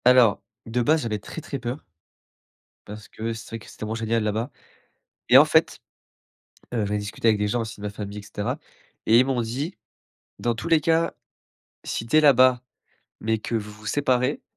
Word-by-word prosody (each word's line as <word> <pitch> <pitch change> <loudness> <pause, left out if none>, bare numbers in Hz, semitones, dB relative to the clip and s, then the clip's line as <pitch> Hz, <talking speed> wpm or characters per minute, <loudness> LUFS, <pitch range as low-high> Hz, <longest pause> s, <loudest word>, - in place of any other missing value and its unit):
Alors 125 -4 +6 0.3
de 120 +2 0
base, 155 +5 +3
j'avais 110 -2 -1
très, 160 - -8
très 140 -2 -5
peur. 125 +4 -5 1.0
Parce 105 0 -9
que 115 +1 -4
c'est 110 - -9
vrai 115 - -6
que - - -15
c'est - - -14
tellement 110 +1 -4
génial 115 0 0
là-bas, 110 +5 -2 0.8
et - - +8
en - - +9
fait, - - +2 0.9
heu, 110 -3 0
j'en 100 - -3
ai - - +1
discuté 105 +2 -3
avec 105 -2 +2
des 105 - +1
gens 120 +3 0
aussi 110 -1 -7
de 105 - -6
ma - - -1
famille, 100 0 -7
et - - -8
cetera, 105 0 -4 0.5
et 115 +2 +6
ils 130 - +5
m'ont 130 -2 0
dit: 135 - -4 0.6
«Dans 120 0 0
tous 110 -2 -5
les 165 -2 +5
cas, 165 +2 +2 0.7
si 115 - -3
tu 125 +7 +3
es - - +7
là-bas, 130 -4 +6 0.6
mais 110 0 0
que 110 - -5
vous, 105 -2 -2
vous 105 0 -14
séparez, 130 +1 +1
115 Hz, 200 wpm, -24 LUFS, 105-130 Hz, 1.0 s, en